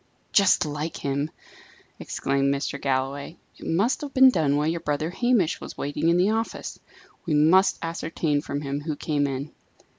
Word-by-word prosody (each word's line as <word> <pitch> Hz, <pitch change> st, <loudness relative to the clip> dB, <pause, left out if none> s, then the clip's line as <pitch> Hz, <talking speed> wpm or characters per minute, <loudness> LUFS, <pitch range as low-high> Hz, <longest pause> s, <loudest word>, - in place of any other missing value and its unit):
"Just 195 Hz, -3 st, +4 dB
like 150 Hz, +2 st, -4 dB
him!" 140 Hz, +2 st, -2 dB, 0.7 s
exclaimed 140 Hz, 0 st, 0 dB
Mr. 140 Hz, 0 st, -3 dB
Galloway. 135 Hz, +4 st, -2 dB, 0.2 s
"It -, -, -8 dB
must 200 Hz, -, +1 dB
have 285 Hz, -2 st, -7 dB
been 260 Hz, 0 st, +8 dB
done 150 Hz, -, +1 dB
while 150 Hz, -, +1 dB
your 165 Hz, +2 st, 0 dB
brother 150 Hz, +2 st, -2 dB
Hamish 230 Hz, -4 st, +1 dB
was -, -, -8 dB
waiting 145 Hz, +3 st, -1 dB
in 170 Hz, -, +4 dB
the 185 Hz, +4 st, +3 dB
office. 225 Hz, +1 st, -3 dB, 0.5 s
We 155 Hz, -, +1 dB
must 165 Hz, +6 st, +4 dB
ascertain 165 Hz, -2 st, -1 dB
from 145 Hz, -1 st, -4 dB
him 140 Hz, 0 st, -3 dB
who 155 Hz, 0 st, -3 dB
came 145 Hz, -1 st, 0 dB
in." 135 Hz, +2 st, -4 dB
155 Hz, 170 wpm, -25 LUFS, 140-175 Hz, 0.7 s, been